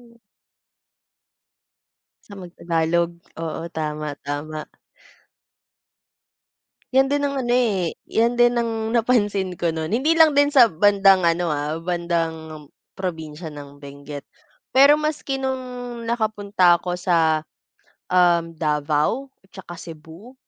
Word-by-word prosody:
oo. - - -25 2.1
Kesa 200 -1 -10
mag 175 -1 -11
tagalog? 170 0 0 0.3
Oo 165 0 -4
tama 150 -2 -4
tama. 150 +2 -5 2.3
Yan 270 +1 +4
din 285 0 0
ang 280 -1 -2
ano 240 - -5
eh, 205 -9 0
yan 235 +2 +1
din 240 0 +5
ang 225 -1 -3
napansin 205 -6 +1
ko 170 -1 -1
nun. 160 0 -4
Hindi 270 - +2
lang 320 -3 +5
din 285 +1 +4
sa 245 -4 +7
bandang 195 0 +4
ano 170 0 +1
ah, 150 +2 -2
bandang 165 -3 -3 0.2
probinsya 160 -3 -6
ng 145 -1 -12
Benguet. 140 +1 -9 0.5
Pero 275 +3 +6
maski 295 -3 -3
nung 250 -2 -5
nakapunta 205 -6 +2
ako 175 +1 -4
sa, 165 -3 +1 0.7
um, 175 -2 +3
Davao 150 - -1 0.2
at - - -36
tsaka 175 -3 -10
Cebu. 165 - -12
180 Hz, 115 wpm, -22 LUFS, 160-235 Hz, 2.3 s, sa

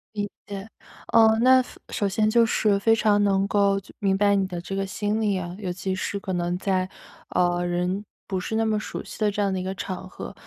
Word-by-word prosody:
理 205 -1 -2 0.2
解。 200 +1 -6 0.5
呃， 220 -1 +6
那 260 +1 +7 0.3
首 205 - 0
先 215 +2 +2
就 230 +1 +5
是 205 -3 +2
非 225 +2 +4
常 210 -2 +3
能 195 -1 +2
够 200 -1 +3
就 - - -17
明 195 -1 +2
白 200 0 +4
你 195 -1 +2
的 175 -2 -5
这 195 - -7
个 195 0 -1
心 210 +2 -1
理 205 -3 +1
啊， 175 -1 -5
尤 185 -3 -3
其 190 +1 -3
是 195 +2 -3
可 195 -1 -5
能 175 0 -1
在， 185 -1 0 0.4
呃， 175 0 +1
人 180 +3 -1 0.2
不 190 - -2
是 220 +4 -4
那 225 0 +2
么 215 -1 +1
熟 - - -6
悉 - - -10
的 210 -1 +3
这 205 +1 -2
样 195 -1 +1
的 185 - -1
一 - - -3
个 190 +1 -3
场 185 0 -5
合。 - - -8
200 Hz, 250 characters per minute, -25 LUFS, 185-210 Hz, 0.5 s, 那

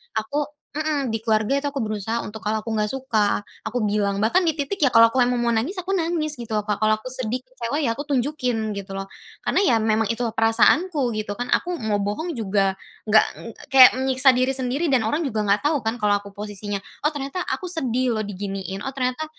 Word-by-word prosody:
aku 280 +7 -1 0.2
mhm, 300 -3 -1
di 225 - -1
keluarga 220 +4 +2
itu 280 - -3
aku 275 -1 -3
berusaha 215 +1 -2
untuk 215 0 -9
kalau 215 +1 0
aku 225 - -7
nggak 210 0 0
suka, 225 -7 0 0.2
aku 235 +2 -2
bilang, 200 -1 0
bahkan 345 - +3
di 325 - +2
titik 290 +6 -3
ya 255 - +1
kalau 230 0 +8
aku 260 - -4
mau 250 - +5
emang 245 - -1
mau - - +2
nangis, 240 +12 0
aku 370 +2 -4
nangis 320 -3 -1
gitu 235 -2 -6
loh, 210 - +1
Kak, 210 -1 -2
kalau 215 0 +3
aku 215 +4 -8
sedih, 255 -1 -2
kecewa, 255 +2 -4
ya 230 -5 0
aku 285 - -5
tunjukin 250 -5 -1
gitu 195 -1 -7
loh, 195 0 -5 0.3
karena - - +1
ya 245 - +4
memang 220 0 +2
itu 235 - -6
perasaanku 240 +7 +3
gitu 210 -1 -3
kan, 245 +4 -5
aku 360 - +1
mau 215 -2 0
bohong 210 - -3
juga 195 -3 0 0.3
nggak 215 +1 +6 0.2
ng - - -9 0.3
kayak 260 -1 +10
menyiksa 265 0 +3
diri 255 +1 +3
sendiri 265 +4 -1
dan 255 - +4
orang 310 +6 0
juga 225 -6 -1
nggak 205 +7 +2
tahu 295 -2 +2
kan 225 +2 -2
kalo 205 -3 +1
aku 200 - -11
posisinya, 205 -1 -3 0.3
oh, - - +5
ternyata 285 +5 -4
aku 370 - -3
sedih 255 -8 0
loh 215 - -1
diginiin, 195 -1 -5
oh, 270 - -4
ternyata 255 +3 -2
235 Hz, 225 wpm, -23 LUFS, 215-275 Hz, 0.3 s, kayak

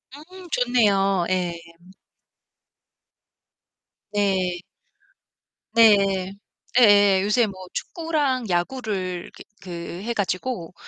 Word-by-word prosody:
음 360 +4 -13
좋네요. 200 - +2
예. 180 -2 0 2.6
네. 190 -4 0 1.1
네, 195 -4 +4 0.5
예예 205 -4 +6
요새 210 +4 +2
뭐 200 - -6 0.2
축구랑 290 - -2
야구를 185 -2 -3
기 - - -12 0.2
그 185 - -12 0.3
해 235 +1 -2
가지고 190 -2 -3
205 Hz, 130 characters per minute, -23 LUFS, 185-245 Hz, 2.6 s, 예예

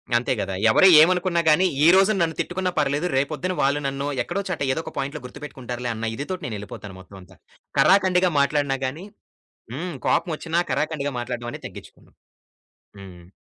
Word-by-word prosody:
అంతే 120 +2 +1
గదా! 95 -1 -3 0.2
ఎవరు 190 +12 +6
ఏమనుకున్న 180 0 +2
గాని 170 +5 +4 0.2
ఈ - - +7
రోజున 195 +1 +4
నన్ను 165 -1 0
తిట్టుకున్న 185 +1 -2
పర్లేదు 145 +3 0
రేపొద్దున 155 +7 -1
వాళ్ళు 140 +2 +2
నన్ను 140 +1 -3 0.2
ఎక్కడో 190 +3 -3
చోట 180 - -4
ఎదోక 160 - -5
పాయింట్‌లో 140 +2 -4
గుర్తుపెట్టుకుంటారులే 125 -2 -7
అన్న 110 0 -3
ఇదితోటి 180 +7 -5
నేనేళ్ళిపోతాను 105 -3 -7
మొత్తం 95 +1 -14
అంతా. 90 - -18 0.4
కరాకండిగా 185 -2 +4
మాట్లాడిన 140 -1 +1
గాని 150 +8 -5 0.7
హ్మ్. 170 +5 -5
కోపం 170 - +1
ఒచ్చినా 165 +1 -1
కరాకండిగా 145 +1 -2
మాట్లాడ్డం 120 0 -5
అనేది - - -9
తగ్గిచ్చుకోను. - - -14 0.9
హ్మ్. 90 -2 -13
145 Hz, 150 wpm, -23 LUFS, 125-175 Hz, 0.9 s, ఈ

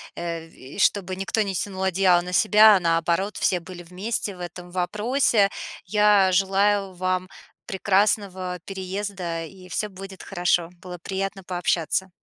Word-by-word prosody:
э, 170 -1 -5
в 165 - -22
и 130 +9 -11
чтобы 190 -2 +2
никто 195 +3 -1
не 200 -2 -1
тянул 190 +1 -3
одеяло 185 -1 +3
на 180 +1 -7
себя, 215 +1 +7
а - - +3
наоборот, 170 +3 0
все 180 - +1
были 175 +1 -10
вместе 195 +3 -3
в - - -15
этом 175 0 -8
вопросе. 210 +4 +2 0.4
Я 205 -1 +4
желаю 195 +1 +2
вам 185 0 -2 0.4
прекрасного 190 -2 0
переезда, 190 -3 -4
и 185 +2 -13
всё 210 +4 -2
будет 195 0 -10
хорошо. 175 -1 0
Было 180 -1 -8
приятно 195 +1 -4
пообщаться. 180 0 -1
190 Hz, 145 wpm, -24 LUFS, 180-200 Hz, 0.4 s, себя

